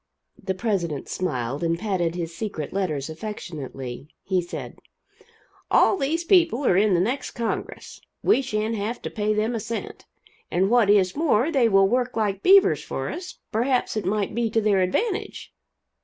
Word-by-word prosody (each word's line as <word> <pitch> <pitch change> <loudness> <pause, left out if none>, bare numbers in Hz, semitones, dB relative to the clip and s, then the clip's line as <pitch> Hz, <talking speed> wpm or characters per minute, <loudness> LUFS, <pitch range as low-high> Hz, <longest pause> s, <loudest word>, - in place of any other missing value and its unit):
The 190 -2 -2
president 180 - -2
smiled, 140 -5 -2
and 165 0 +1
patted 175 -4 -1
his 170 -1 -4
secret 165 -7 -5
letters 155 -8 -1
affectionately. 150 - -7 0.2
He 185 -2 +1
said: 175 - -8 0.9
"All - - +5
these 330 0 -1
people 335 - +3
are 180 - +4
in 200 0 +4
the - - +2
next 240 +10 -1
Congress. 230 -2 -5 0.2
We 400 - +4
shan't 220 -3 -2
have 215 +4 -3
to - - -4
pay 215 -1 0
them 215 +3 0
a 230 - -2
cent. 230 +1 -6 0.4
And 190 +4 +1
what 240 -4 +4
is 195 -3 +4
more, 295 -2 +2
they 255 -6 +3
will 195 -1 +5
work 245 +2 0
like 200 -3 0
beavers 390 +1 +5
for - - -4
us 360 +1 -7
perhaps 245 +3 0
it 215 - -1
might 200 +1 -1
be 230 0 0
to 225 - +1
their 205 -3 +2
advantage." 390 - -2
210 Hz, 170 wpm, -24 LUFS, 180-240 Hz, 0.9 s, All